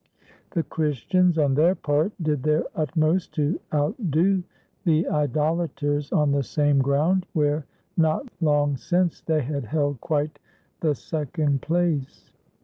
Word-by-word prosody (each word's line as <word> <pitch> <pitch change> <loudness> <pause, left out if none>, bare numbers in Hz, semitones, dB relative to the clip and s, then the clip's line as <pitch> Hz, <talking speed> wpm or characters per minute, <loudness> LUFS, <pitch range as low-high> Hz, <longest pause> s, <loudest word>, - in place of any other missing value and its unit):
The 170 -4 -1
Christians, 160 +4 +1
on 145 -3 +3
their 165 +7 +4
part, 150 +5 0
did 155 -4 0
their 155 +3 +2
utmost 160 +3 0
to 150 +3 0
outdo 170 - +1 0.4
the 165 -3 +2
idolaters 150 0 0
on 150 -2 +2
the 140 0 +2
same 145 +1 +1
ground 150 +7 +2
where, 150 -1 0 0.3
not 160 - +1
long 145 -3 +2
since, 175 +8 0
they 155 -3 0
had 140 0 -3
held 145 +1 -1
quite 150 -1 -1 0.4
the 155 -3 +1
second 150 -1 -2
place. 160 -4 -1
155 Hz, 130 wpm, -24 LUFS, 145-165 Hz, 0.4 s, their